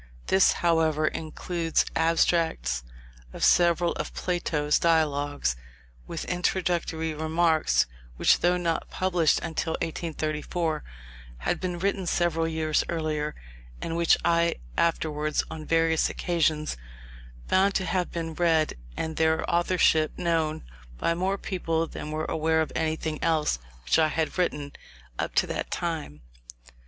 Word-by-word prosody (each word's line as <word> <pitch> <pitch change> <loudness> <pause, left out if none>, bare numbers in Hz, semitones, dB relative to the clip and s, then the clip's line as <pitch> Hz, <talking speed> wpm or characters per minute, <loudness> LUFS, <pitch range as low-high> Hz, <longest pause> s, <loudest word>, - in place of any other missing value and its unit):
This, 190 0 +4
however, 160 -2 +3
includes 165 +1 -1
abstracts 160 - +1 0.5
of - - -5
several 170 0 +4
of - - -8
Plato's 155 -4 0
Dialogues, 145 - +1 0.5
with - - -5
introductory 175 -3 -1
remarks, 160 +1 +2 0.3
which, - - +4
though 175 +1 +3
not 170 -2 -1
published 180 -4 +2
until 160 0 -2
1834, 160 0 -2 0.5
had - - -1
been 180 -2 -3
written 195 0 -1
several 165 -1 +1
years 160 -1 +1
earlier; 155 -2 -2 0.4
and 165 - -4
which 170 -1 +4
I 170 0 +3 0.2
afterwards, 155 -2 0
on 160 -1 -6
various 165 -1 +2
occasions, 160 - 0 0.7
found 195 +1 +3
to 190 - +1
have 180 -1 -1
been 165 -1 -4
read, 160 -2 +2 0.2
and 160 -1 -3
their 160 0 +2
authorship 170 -2 +2
known, 165 -3 0 0.3
by 170 - +1
more 190 +3 -1
people 165 -4 -1
than 150 - -7
were 155 +1 -2
aware 160 0 +1
of 160 - -2
anything 160 -1 -2
else 155 - +1 0.2
which 60 - +2
I 160 - +5
had 160 0 -1
written, 150 -5 -1 0.5
up - - -2
to - - +4
that - - -4
time. 155 - -4
160 Hz, 125 wpm, -27 LUFS, 155-170 Hz, 0.7 s, I